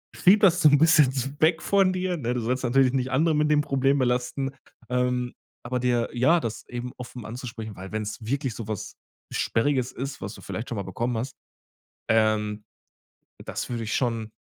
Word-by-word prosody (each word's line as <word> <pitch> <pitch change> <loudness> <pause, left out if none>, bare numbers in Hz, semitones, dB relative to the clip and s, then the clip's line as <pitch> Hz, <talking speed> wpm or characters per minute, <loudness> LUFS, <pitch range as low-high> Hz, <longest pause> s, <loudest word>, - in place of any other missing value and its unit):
schieb 200 +4 +5
das 180 -3 +5
so 155 - +8
'n 145 - +5
bisschen 155 -3 +6
s 135 0 -2
weg 160 +1 +4
von 195 -2 +3
dir, 185 -1 -1
ne, 125 -3 -2
du 125 - -1
sollst 125 +3 -1
natürlich 130 +1 +3
nicht 130 -1 -1
andere 155 +4 +3
mit 150 0 +2
dem 150 - +4
Problem 135 -1 +1
belasten, 125 +2 0 0.4
ähm, 125 0 0 0.3
aber 125 +1 -1
dir 120 -1 +1
ja, 130 +8 +4
das 115 -8 -5
eben 125 0 -5
offen 125 -2 -8
anzusprechen, 115 -2 -7
weil 95 +1 -9
wenn's 105 0 -4
wirklich 130 +2 -2
so 110 -2 -6
was 110 -3 -5 0.4
Sperriges 130 +1 +1
ist, 135 +2 -6
was 100 +3 -5
du - - -12
vielleicht 110 - -5
schon 120 - -3
mal 100 - -2
bekommen 115 +6 -2
hast, 130 +4 -4 0.7
ähm, 110 -1 +1 0.8
das - - -5
würde 115 -2 -3
ich 105 - -2
schon, 115 -4 -1
125 Hz, 190 wpm, -26 LUFS, 115-140 Hz, 0.8 s, so